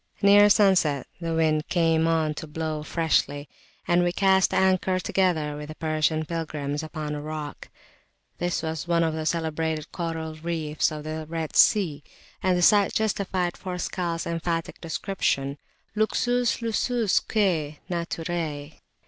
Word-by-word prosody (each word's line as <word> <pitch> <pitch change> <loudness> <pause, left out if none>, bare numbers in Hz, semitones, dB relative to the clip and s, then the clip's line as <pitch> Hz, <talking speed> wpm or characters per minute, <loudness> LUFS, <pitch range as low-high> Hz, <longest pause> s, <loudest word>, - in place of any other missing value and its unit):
Near 205 +1 +7
sunset 190 -9 +3
the 165 -1 -2
wind 155 -1 +1
came 165 -2 +2
on 160 -2 +1
to 155 - -7
blow 155 0 -3
freshly, 150 -2 0 0.4
and 175 +1 +3
we 175 - +1
cast 190 0 +3
anchor 190 0 +2
together 170 -6 0
with 150 0 -7
the 155 - -8
Persian 155 0 0
pilgrims 150 -3 -3
upon 155 -1 -5
a 145 - -4
rock. 150 -1 -6 0.7
This 175 -1 -1
was 160 0 -3
one 170 -1 +2
of 160 -1 0
the 155 0 -3
celebrated 160 -1 -2
coral 165 -2 -4
reefs 155 -1 -1
of 150 -1 -6
the 155 0 -5
Red 165 -2 -4
Sea, 160 -9 +4 0.4
and 185 -1 +2
the 175 - +1
sight 205 0 +5
justified 190 -4 0
Forskal's 180 -2 -3
emphatic 165 0 -3
description 155 -5 -2 0.4
luxus 240 +2 +1
lususque 210 -8 +1
naturae. 165 -4 -4
165 Hz, 135 wpm, -25 LUFS, 155-180 Hz, 0.7 s, Near